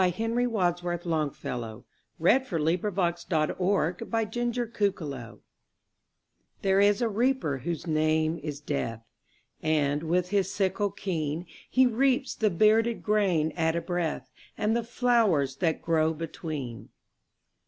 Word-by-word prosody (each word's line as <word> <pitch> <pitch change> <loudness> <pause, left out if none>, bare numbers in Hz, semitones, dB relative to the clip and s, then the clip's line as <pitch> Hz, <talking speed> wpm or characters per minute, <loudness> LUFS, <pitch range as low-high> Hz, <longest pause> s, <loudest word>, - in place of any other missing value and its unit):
Henry 225 +7 +1
Wadsworth 175 -5 -1
Longfellow 125 -8 -3 0.3
The - - -13
Reaper 255 +2 +3
And 155 -1 0
The 175 -3 0 1.4
Flowers 135 -8 -7 1.2
THERE 195 0 +3
is 205 +3 +4
a - - +3
Reaper 230 - +1
whose 165 +7 -4
name 155 0 +1
is 145 -1 -5
Death, 115 -6 -3 0.6
And, 150 -2 +1
with 175 +2 0
his 200 -1 +1
sickle 200 +1 0
keen, 165 -4 -3 0.2
He 260 0 +5
reaps 260 +3 +2
the 215 - +1
bearded 220 +5 +3
grain 190 -7 +2
at 160 0 0
a 170 - 0
breath, 165 -7 -3 0.3
And 215 +2 +1
the 235 - 0
flowers 220 - +2
that 165 -2 0
grow 160 -1 +2
between. 150 -6 -6
175 Hz, 120 wpm, -28 LUFS, 155-210 Hz, 1.4 s, He